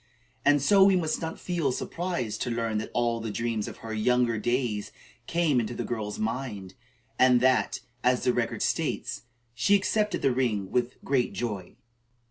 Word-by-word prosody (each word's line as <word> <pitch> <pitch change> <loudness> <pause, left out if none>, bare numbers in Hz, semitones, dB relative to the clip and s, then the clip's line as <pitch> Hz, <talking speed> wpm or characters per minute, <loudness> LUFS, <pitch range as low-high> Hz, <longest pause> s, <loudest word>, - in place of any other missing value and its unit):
And 145 -1 +4
so 195 +4 +6
we 195 0 +6
must 160 -4 0
not 160 0 -4
feel 170 -7 -1
surprised 125 - -3
to 125 - -1
learn 115 -2 -1
that 110 - -5
all 120 -1 0
the 115 0 -4
dreams 115 0 -2
of - - -8
her 110 - -4
younger 120 +1 +2
days 120 -3 -1 0.4
came 165 -6 +2
into 120 +1 -3
the - - -3
girl's 105 -3 -4
mind, 110 -4 -4 0.5
and 125 -1 +6
that, 130 0 +2 0.2
as 125 0 +2
the 125 - +3
record 120 -1 -1
states, - - -1 0.3
"she 125 - +3
accepted 210 0 0
the 135 - +3
ring 110 -7 -1
with 125 0 0
great 130 -3 +1
joy." 105 -7 -4
125 Hz, 170 wpm, -27 LUFS, 110-140 Hz, 0.5 s, so